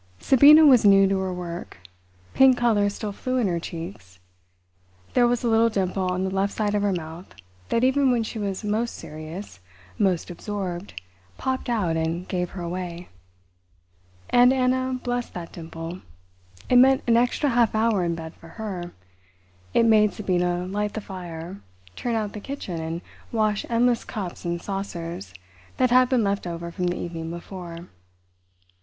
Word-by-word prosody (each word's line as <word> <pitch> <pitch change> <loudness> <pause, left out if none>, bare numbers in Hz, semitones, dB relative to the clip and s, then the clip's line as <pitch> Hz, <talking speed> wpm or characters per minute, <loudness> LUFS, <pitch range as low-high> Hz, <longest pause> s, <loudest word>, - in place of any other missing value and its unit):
Sabina 290 - +7
was 260 -5 +7
new 195 -1 +6
to 195 0 +1
her 190 -1 -2
work. 175 - -6 0.6
Pink 265 -1 +6
colour 215 -4 +3
still 205 +1 -5
flew 255 +5 -3
in 245 - +2
her 170 -2 0
cheeks; 165 - -8 1.0
there 245 -1 +5
was 240 0 0
a - - +1
little 225 0 +4
dimple 190 -2 -1
on 180 +1 -1
the 190 - -1
left 195 +1 0
side 210 -1 -1
of 205 - +1
her 205 -1 +1
mouth 165 0 -5 0.4
that 230 - +1
even 265 +1 +3
when 240 -2 +2
she 220 0 -5
was 200 0 -3
most 220 +3 -1
serious, 155 - -8 0.4
most 185 -5 +1
absorbed, 185 - -5 0.4
popped 260 -1 -2
out 200 -9 0
and 165 +2 -2
gave 180 -1 -2
her 180 - -7
away. 175 0 -5 1.2
And 245 +1 +6
Anna 255 0 +1
blessed 245 -1 -3
that 170 -2 -6
dimple. 165 +1 -7 0.7
It 250 - +4
meant 265 +1 +6
an 235 - +4
extra 245 +5 +2
half 235 -3 +2
hour 215 -3 +2
in 170 -1 0
bed 160 0 -7
for 165 - -16
her; 180 -2 -6 0.8
it 230 - +5
made 215 -2 +5
Sabina 180 -3 0
light 205 +2 -2
the 220 - -3
fire, 180 -1 -8 0.3
turn 240 -2 -2
out 215 -2 -2
the 210 - -6
kitchen 200 -10 -5
and 165 +1 -4 0.3
wash 215 -2 0
endless 235 0 +2
cups 185 -4 -6
and 170 0 -1
saucers 170 - -5 0.4
that 255 -1 +2
had 255 0 +5
been 250 -4 +2
left 200 -2 -1
over 170 0 -5
from 180 0 -2
the 175 - -1
evening 165 -2 -5
before. 170 0 -8
195 Hz, 165 wpm, -24 LUFS, 175-230 Hz, 1.2 s, Sabina